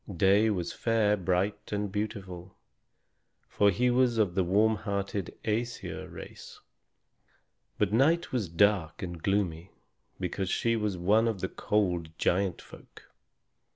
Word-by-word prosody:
Day 100 +5 +4
was 90 -5 -2
fair, 110 -3 +2
bright, 95 +1 -1
and 105 -1 -2
beautiful, 95 -3 -5 0.9
for 100 - +3
he 125 +6 +2
was 125 -1 +2
of 105 -5 +2
the 95 +1 +1
warm 105 +5 +3
hearted 100 -3 -4
Æsir 115 +3 -3
race. - - -11 1.2
But 105 -1 0
Night 160 +8 +3
was 115 -9 -1
dark 90 -2 +2
and 85 -2 -6
gloomy, 95 -3 -1 0.5
because 95 0 -3
she 115 +3 +1
was 105 -4 -1
one 105 +6 +3
of 110 -4 -1
the 95 - -2
cold 90 -6 0
giant 95 0 0
folk. - - -16
100 Hz, 130 wpm, -29 LUFS, 90-110 Hz, 1.2 s, Day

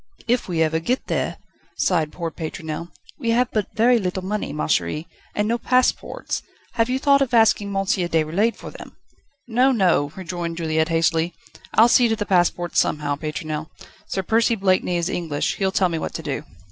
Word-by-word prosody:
"If 245 +1 +1
we 165 -3 +1
ever 160 0 +1
get 245 +11 -1
there!" - - -2 0.4
sighed 160 -5 +1
poor 170 -2 -4
Pétronelle; 160 +1 -6 0.3
"we 235 - -2
have 250 0 +1
but 215 -3 0
very 235 +2 +4
little 185 -1 -3
money, 210 +2 -2
ma 150 - -2
chérie, 90 - 0 0.3
and 210 0 +1
no 235 +2 0
passports. 255 +1 0 0.3
Have 230 +1 +1
you 255 - +1
thought 280 0 +4
of 250 -3 +1
asking 220 -2 +4
M. 200 - -5
Déroulède 180 +2 +1
for - - -9
them?" - - -12 0.5
"No, 250 +3 +3
no," 180 - +2
rejoined 175 -2 -5
Juliette 160 -1 0
hastily; 165 +1 +1 0.4
"I'll 225 - +7
see 240 0 +5
to 225 - +1
the 210 -1 -3
passports 175 -2 +2
somehow, 145 -1 0
Pétronelle. 155 +1 -4 0.4
Sir 190 - -2
Percy 230 +4 +2
Blakeney 185 -3 +1
is 170 0 -1
English; 160 -6 -2
he'll 190 -1 +1
tell 190 -1 +2
me 165 -2 -2
what - - -5
to 160 - -5
do." 145 -1 -3
180 Hz, 185 wpm, -22 LUFS, 160-225 Hz, 0.5 s, I'll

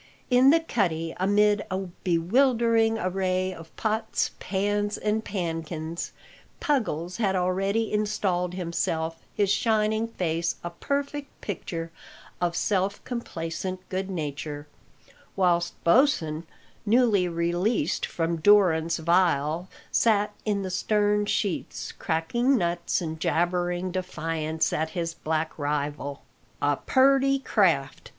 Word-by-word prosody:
In 250 +2 +6
the 325 +3 +6
cuddy, 170 - -1
amid 205 +2 +3
a 185 - -1
bewildering 225 +6 +2
array 185 -1 0
of 165 -2 -11
pots, 220 0 -1
pans, 205 +2 -1
and 215 +1 0
pannkins, 165 -3 -4 0.5
Puggles 185 - -1
had 200 -4 +1
already 195 +5 0
installed 195 -4 0
himself, 165 -2 -2 0.2
his 200 -2 +2
shining 220 0 +2
face 170 -6 -1
a 175 - -4
perfect 280 0 -3
picture 165 -4 -5 0.5
of 175 -1 0
self 200 0 0
complacent 185 -5 -5
good 190 +1 -2
nature, 150 -3 -4 0.7
whilst 175 -2 +2
Bosin, 170 - +3 0.4
newly 220 -4 +3
released 175 +2 0
from 165 0 -1
durance 170 -3 +4
vile, 170 0 +1 0.2
sat 210 -2 +3
in 205 -2 0
the 185 - -4
stern 210 +2 +1
sheets, 200 -4 -2
cracking 235 +12 +1
nuts 170 -2 0
and 160 -2 -4
jabbering 175 +2 0
defiance 165 -3 -2
at 160 +1 0
his 165 -1 -1
black 160 0 -2
rival. 145 -1 -2 0.4
"A 145 -1 +1
purty 275 +1 +4
craft!" 170 - +1
185 Hz, 110 wpm, -26 LUFS, 165-210 Hz, 0.7 s, In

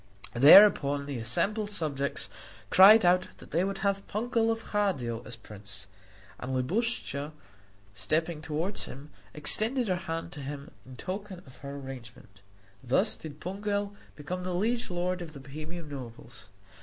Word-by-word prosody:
Thereupon 145 - +7
the 140 -4 -4
assembled 205 - +1
subjects 145 -8 -2 0.4
cried 200 +2 +8
out 180 +1 +4
that - - -15
they 170 +3 +2
would 195 0 -2
have 195 0 0
Pungel 225 +1 0
of 225 0 -3
Hadio 130 - -1
as 120 - -6
prince; 100 -3 -8 0.5
and 130 +1 -3
Libuscha, 150 - -1 0.6
stepping 155 - -1
toward 160 +6 -2
him, 140 +3 -6 0.2
extended 220 - +2
her 180 - +1
hand 165 -1 -5
to 160 - -9
him 140 +1 -7 0.2
in 130 - -10
token 190 +4 -6
of 130 -2 -16
her 140 0 -7
agreement. 120 -7 -10 0.4
Thus 160 - +2
did 150 -2 -10
Pungel 200 +3 -3 0.2
become 175 +5 -5
the 180 -1 -2
liege 230 +6 0
lord 180 0 -2
of 165 -3 -8
the 140 - -9
Bohemian 155 +4 -8
nobles. 125 -5 -9
160 Hz, 145 wpm, -29 LUFS, 135-200 Hz, 0.6 s, cried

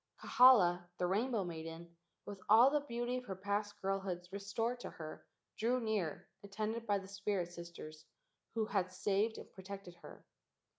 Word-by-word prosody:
Kahala, 180 -9 +6
the 180 - 0
rainbow 215 +4 +1
maiden, 165 0 -7 0.3
with 200 -2 -8
all 235 +6 +8
the 295 - +3
beauty 240 +1 -2
of 250 - -6
her 190 - -4
past 205 +2 -2
girlhood 190 -2 -2
restored 210 +5 -2
to - - -6
her, 155 -1 -9 0.3
drew 245 +3 +2
near, 215 -9 -2 0.2
attended 215 +3 -3
by 205 -1 +3
the 195 - -7
two 200 - -12
spirit 200 -3 -1
sisters 170 -3 -9 0.5
who 225 -1 +1
had 190 -4 0
saved 205 +4 0
and - - -11
protected 190 -1 -8
her. - - -13
200 Hz, 160 wpm, -36 LUFS, 180-220 Hz, 0.5 s, all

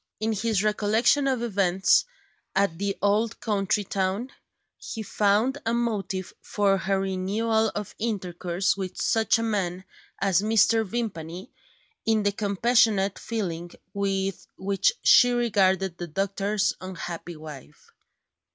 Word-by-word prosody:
In 220 +1 0
his 215 -1 0
recollection 220 +6 +2
of 255 -3 0
events 195 -4 +3 0.5
at 195 -4 +1
the 200 0 -2
old 215 +3 +1
country 205 -2 0
town, 195 +6 -2 0.4
he 220 - -7
found 215 +7 +1
a 230 +1 0
motive 205 -5 -2
for 200 -2 +1
her 195 0 0
renewal 210 +4 0
of 210 -2 -5
intercourse 185 -4 -1
with 190 -2 -5
such 220 -1 +2
a 230 - -2
man 190 -5 -2 0.3
as 195 -2 +2
Mr. 225 +1 +3
Vimpany, 190 -3 -5 0.5
in 220 -1 +2
the 205 - +2
compassionate 205 -1 +2
feeling 175 -7 -4 0.2
with 195 -1 -2
which 195 - +1
she 245 0 +6
regarded 195 -6 +1
the 175 - -4
doctor's 195 +4 0
unhappy 175 -2 -6
wife. 150 - -12
200 Hz, 125 wpm, -26 LUFS, 190-220 Hz, 0.5 s, she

